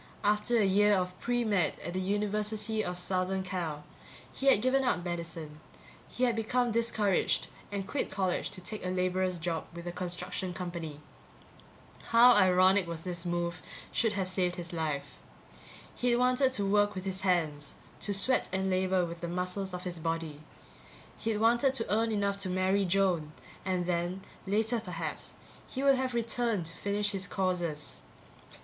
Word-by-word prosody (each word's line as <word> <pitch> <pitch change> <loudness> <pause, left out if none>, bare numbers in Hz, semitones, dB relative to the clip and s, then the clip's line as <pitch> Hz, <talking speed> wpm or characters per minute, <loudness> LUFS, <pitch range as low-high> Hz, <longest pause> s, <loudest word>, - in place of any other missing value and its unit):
After 210 +3 +2
a 215 - +4
year 205 +2 +4
of 180 0 -1
pre 240 0 0
med 200 -8 +1
at 175 - -4
the 185 - -1
University 210 +2 0
of 180 -2 -3
Southern 185 +1 -1
Cal, 170 -5 -3 0.5
he 275 - -3
had 270 - +7
given 255 +4 +2
up 215 -8 0
medicine; 165 -3 -4 0.5
he 250 - -3
had 240 -2 +3
become 240 +2 +1
discouraged 220 -4 +1 0.2
and 195 -1 -3
quit 285 - -1
college 190 -2 -1
to 185 - -9
take 210 +4 -5
a 180 - -2
laborer's 185 0 0
job 165 -1 -2
with 170 0 -7
a 175 - -3
construction 180 0 -3
company. 170 -5 -5 1.1
How 235 +2 +7
ironic 185 -2 +5
that 165 -1 -5
this 175 -1 -3
move 175 0 -2 0.3
should 225 -2 +1
have 190 -2 -1
saved 185 -1 0
his 175 -1 -6
life! 150 -4 -3 0.8
He'd 245 -1 +1
wanted 255 +2 +3
to 205 -5 +1
work 205 +1 +3
with 185 0 -5
his 190 0 -2
hands, 160 -6 0 0.2
to 205 - -2
sweat 225 +6 +1
and 190 0 0
labor 185 -1 +2
with 170 0 -7
the 170 - -3
muscles 180 +2 -2
of 180 0 -5
his 175 -2 -4
body. 165 -2 -3 0.8
He'd 225 -1 -1
wanted 240 +5 +3
to 225 -4 0
earn 225 +1 +2
enough 200 -1 0
to 190 -1 -1
marry 190 +2 +2
Joan 175 -5 +1 0.3
and 185 -2 0
then, 175 +2 -1 0.2
later 220 +4 +1
perhaps, 170 -7 -5 0.3
he 265 - -4
would 275 -1 +5
have 255 -1 -1
returned 230 -4 0
to 165 +1 -5
finish 205 +1 0
his 195 -1 -1
courses. 175 -6 -2
190 Hz, 170 wpm, -31 LUFS, 175-210 Hz, 1.1 s, had